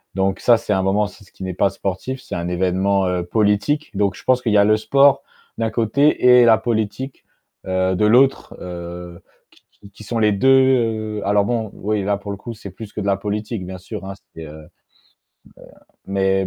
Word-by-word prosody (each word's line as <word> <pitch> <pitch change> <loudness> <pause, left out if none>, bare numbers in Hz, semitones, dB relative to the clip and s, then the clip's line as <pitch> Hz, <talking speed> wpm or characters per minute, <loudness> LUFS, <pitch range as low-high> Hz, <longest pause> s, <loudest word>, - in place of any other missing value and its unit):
donc 95 0 0
ça, 120 -1 +5
c'est 105 - -2
un 95 - +1
moment 95 +3 +1
aussi 105 0 -7
ce 95 - -22
qui - - -11
n'est 95 -1 -4
pas 100 +3 +2
sportif, 100 +7 -5
c'est - - -7
un 85 0 -3
évènement, 95 +2 +1
heu, 90 -1 -1
politique. 105 +9 0
Donc 100 -1 0
je - - -13
pense 130 -1 +3
qu'il 115 - -1
y - - +5
a 100 - +6
le 110 +1 +4
sport, 140 +5 +3 0.3
d'un 115 -1 -1
côté 120 +7 +1
et 120 - +6
la 115 -1 +6
politique, 110 +3 -3 0.4
heu, 95 0 0
de 105 - +1
l'autre, 130 +5 +3
heu 85 -1 -8 0.3
qui - - -26
qui 100 - -17
qui 105 - -14
sont 115 +2 -3
les 105 -1 +3
2 105 +7 +2 0.7
heu - - -4
alors 100 0 +3
bon, 115 -1 -2
oui 105 0 -2
là 100 +1 0
pour 100 0 -7
le 100 - -5
coup, 115 +4 -8
c'est 105 -3 -10
plus 105 +3 -10
que - - -4
de - - -5
la 100 -1 +1
politique 105 0 -4
bien 95 +1 -7
sûr 95 +2 -8
hein, 95 - -6 0.2
c'est 80 - -9
heu 75 0 -12 1.4
mais 95 0 0
100 Hz, 215 wpm, -20 LUFS, 95-110 Hz, 1.4 s, a